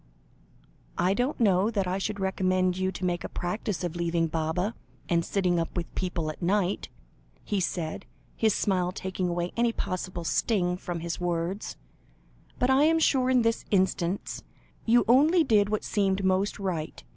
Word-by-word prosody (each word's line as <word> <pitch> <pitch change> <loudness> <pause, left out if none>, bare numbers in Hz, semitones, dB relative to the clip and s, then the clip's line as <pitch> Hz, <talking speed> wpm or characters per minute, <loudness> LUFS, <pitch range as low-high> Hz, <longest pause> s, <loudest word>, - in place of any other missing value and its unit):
"I 185 +2 +2
don't 245 +7 -1
know 200 -2 +3
that 200 -4 0
I 185 +2 -1
should 205 +1 -3
recommend 185 -1 +1
you 185 0 -1
to 185 - -4
make 175 -1 -1
a - - -5
practice 180 0 -3
of 175 -1 -3
leaving 170 -1 0
Baba, 165 +6 -1 0.3
and 170 -1 +2
sitting 180 -3 +1
up 165 +2 -3
with 170 - -4
people 170 -4 -2
at 155 - -14
night," 190 +1 0 0.5
he 205 - -1
said, 170 -3 -3 0.3
his 220 -2 +2
smile 180 -3 +1
taking 185 -1 -3
away 175 0 -2
any 235 0 +2
possible 185 -4 -4
sting 180 0 +1
from 175 -2 -5
his 170 +1 -4
words; 175 +3 -2 0.8
"but 250 +1 +2
I 270 +3 +5
am 325 +1 +4
sure 265 -5 +3
in 250 -2 +4
this 230 0 +1
instance, 190 -1 0 0.4
you 240 +1 +5
only 305 +8 +5
did 210 -7 +3
what 215 0 -1
seemed 195 -2 0
most 190 +2 +1
right. 180 -6 -4
185 Hz, 170 wpm, -27 LUFS, 175-210 Hz, 0.8 s, I